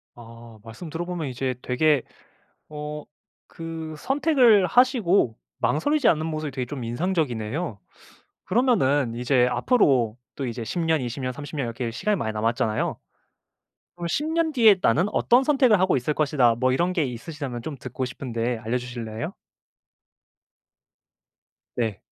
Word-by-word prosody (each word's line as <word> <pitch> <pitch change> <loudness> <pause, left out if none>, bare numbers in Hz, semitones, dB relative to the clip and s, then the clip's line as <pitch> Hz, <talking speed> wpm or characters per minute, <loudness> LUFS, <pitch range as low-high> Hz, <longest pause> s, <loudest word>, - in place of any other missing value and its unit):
아 115 -1 -13
말씀 115 +9 -9
들어 165 +3 -3
보면 175 -4 -4
이제 130 0 -2
되게 145 +2 +2 0.7
어 150 0 -6 0.4
그 165 -1 -7
선택을 265 - +4
하시고 200 - +3 0.2
망설이지 280 - +1
않는 155 -1 +3
모습이 155 -2 -3
되게 130 -2 -3
좀 130 0 -6
인상적이네요. 125 - -2 0.7
그러면은 145 - +2
이제 125 +1 +2
앞으로 125 - +2 0.2
또 135 - -4
이제 120 -1 -4
10 170 - -3
년, 160 -2 +2
20 125 +2 -4
년, 130 0 -2
30 145 +3 -9
년 140 -4 -1
이렇게 115 0 -4
시간이 210 - 0
많이 110 - -2
남았잖아요. 110 0 -1 1.0
그럼 175 -1 -5
'10 290 - -1
년 320 0 0
뒤에 225 -7 +6
나는 155 - +3
어떤 245 +2 +4
선택을 265 -8 +4
하고 185 -4 +3
있을 130 +4 0
것이다.' 140 -6 +2
뭐 130 +2 +2
이런 175 +7 +1
게 170 -4 +1
있으시다면 130 0 -6
좀 145 +1 -6
듣고 130 +1 -4
싶은데 120 -2 -3
알려 110 +3 -2
주실래요? 120 -3 -5 2.4
네. 110 -4 -2
140 Hz, 285 characters per minute, -24 LUFS, 120-175 Hz, 2.4 s, 뒤에